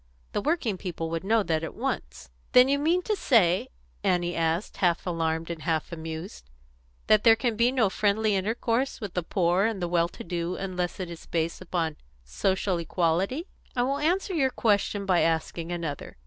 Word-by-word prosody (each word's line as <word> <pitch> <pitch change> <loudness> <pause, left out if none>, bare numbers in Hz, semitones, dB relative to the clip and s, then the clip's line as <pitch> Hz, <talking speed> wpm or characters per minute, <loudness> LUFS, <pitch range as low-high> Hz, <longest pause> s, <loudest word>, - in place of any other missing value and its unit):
The - - -1
working 245 - 0
people 165 -3 -4
would 165 +1 -2
know 220 +2 +3
that 160 -3 0
at 165 - -5
once." 65 0 -4 0.2
"Then 250 +1 +8
you 280 +1 +2
mean 340 +5 +2
to 425 - 0
say," 190 - +3 0.3
Annie 175 -1 +1
asked, 165 +3 -1
half 175 -3 +1
alarmed 165 -1 -1
and 165 -2 -6
half 160 0 -1
amused, 160 - -7 0.6
"that 215 -1 +4
there 225 -1 +7
can 230 0 -1
be 235 +3 +3
no 250 -5 +3
friendly 210 +2 +1
intercourse 230 +6 0
with 205 -6 -6
the 180 - 0
poor 180 +2 +1
and 225 -3 -1
the 175 - -1
well 170 -1 +2
to - - -10
do 170 +1 -3
unless 180 -2 -3
it 180 -2 -4
is 170 - -10
based 165 +1 -2
upon 165 -4 -2 0.3
social 185 - 0
equality?" 180 - 0 0.3
"I 245 - +2
will 275 +3 0
answer 360 +6 +1
your 275 -6 +2
question 205 -4 +1
by 185 -3 +3
asking 165 +1 0
another. 165 - -5
185 Hz, 185 wpm, -27 LUFS, 165-225 Hz, 0.6 s, Then